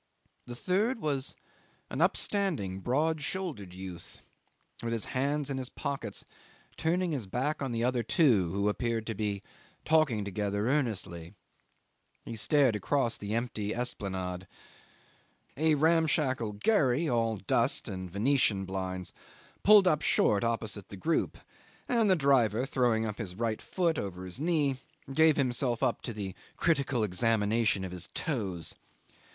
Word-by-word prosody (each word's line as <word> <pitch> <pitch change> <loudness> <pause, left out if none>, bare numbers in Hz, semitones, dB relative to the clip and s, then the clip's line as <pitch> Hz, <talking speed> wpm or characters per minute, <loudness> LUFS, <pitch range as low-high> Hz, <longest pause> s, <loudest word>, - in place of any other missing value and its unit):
The 120 - -6
third 205 - 0
was 140 -6 -2 0.6
an 135 - -2
upstanding, 175 - +1
broad 150 +9 0
shouldered 145 - -4
youth, 90 -2 -9 0.6
with 115 0 -2
his 115 - -1
hands 140 +2 0
in 135 - -2
his 130 -1 -4
pockets, 140 +1 -5 0.5
turning 175 +2 0
his 130 -9 -3
back 130 +10 -1
on 135 -2 -2
the 115 0 -1
other 125 0 +1
two 115 - +3
who 100 +1 0
appeared 115 +1 -1
to 115 - -3
be 100 -1 -3 0.4
talking 150 -10 +3
together 100 +1 -1
earnestly. 105 - -2 0.9
He 115 - -6
stared 135 0 +3
across 120 +3 0
the 105 +2 -4
empty 110 -3 -2
Esplanade. 95 -6 -3 1.1
A 155 +2 +3
ramshackle 150 -7 +2
gharry, 145 - +2
all 115 -3 +1
dust 95 - +1
and 95 -1 -5
venetian 105 -1 +2
blinds, 95 -1 -4 0.5
pulled 205 -2 +7
up 155 -4 +3
short 100 -7 +3
opposite 110 -4 -2
the 100 - -8
group, 165 - 0 0.5
and 230 -4 +2
the 185 - +6
driver, 130 - +3
throwing 120 -4 +1
up 105 0 -5
his 95 -6 -4
right 115 0 -2
foot 170 -4 0
over 95 -2 -5
his 90 +6 -5
knee, 150 -4 +1 0.4
gave 160 0 +5
himself 125 -2 +1
up 125 -3 +1
to 120 - -5
the 100 -4 -5 0.2
critical 140 -7 +1
examination 105 0 +2
of 90 - -6
his 90 -1 -4
toes. 95 - -2
120 Hz, 140 wpm, -30 LUFS, 100-150 Hz, 1.1 s, pulled